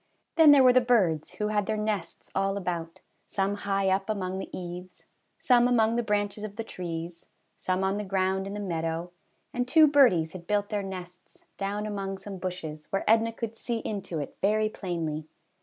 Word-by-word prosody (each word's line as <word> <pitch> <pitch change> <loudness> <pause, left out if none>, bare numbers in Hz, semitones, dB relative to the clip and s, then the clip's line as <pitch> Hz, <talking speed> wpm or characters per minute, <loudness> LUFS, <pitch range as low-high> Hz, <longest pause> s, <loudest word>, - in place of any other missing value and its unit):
Then 320 -2 +7
there 285 -2 +8
were 250 -1 +7
the 255 - +6
birds, 195 -11 +2
who 210 0 -1
had 210 -2 0
their 215 - 0
nests 210 -6 -3
all 195 +1 0
about, 170 -3 -4 0.3
some 195 0 0
high 195 -1 -1
up 195 +2 0
among 190 -3 -2
the - - -6
eaves, 180 0 -8 0.3
some 245 -1 +4
among 225 -2 +3
the 240 - +2
branches 205 -1 -1
of 210 -1 -6
the 225 - -3
trees, 170 -4 -6 0.3
some 185 +1 -1
on 190 +1 +1
the - - -2
ground 190 0 0
in 200 - -5
the - - -4
meadow; 165 -2 -3 0.4
and 245 0 -1
two 315 +4 +7
birdies 240 - +4
had 170 -2 -9
built 205 -1 +1
their 210 -2 -1
nests 185 -2 -9
down 205 +1 -2
among 195 -2 -3
some 195 0 -8
bushes, 160 -5 -5
where 195 - -2
Edna 225 +1 +4
could 225 0 -5
see 235 0 -3
into 200 -6 -4
it 145 - -5
very 215 +2 +2
plainly. 165 -6 -4
195 Hz, 190 wpm, -28 LUFS, 180-215 Hz, 0.4 s, there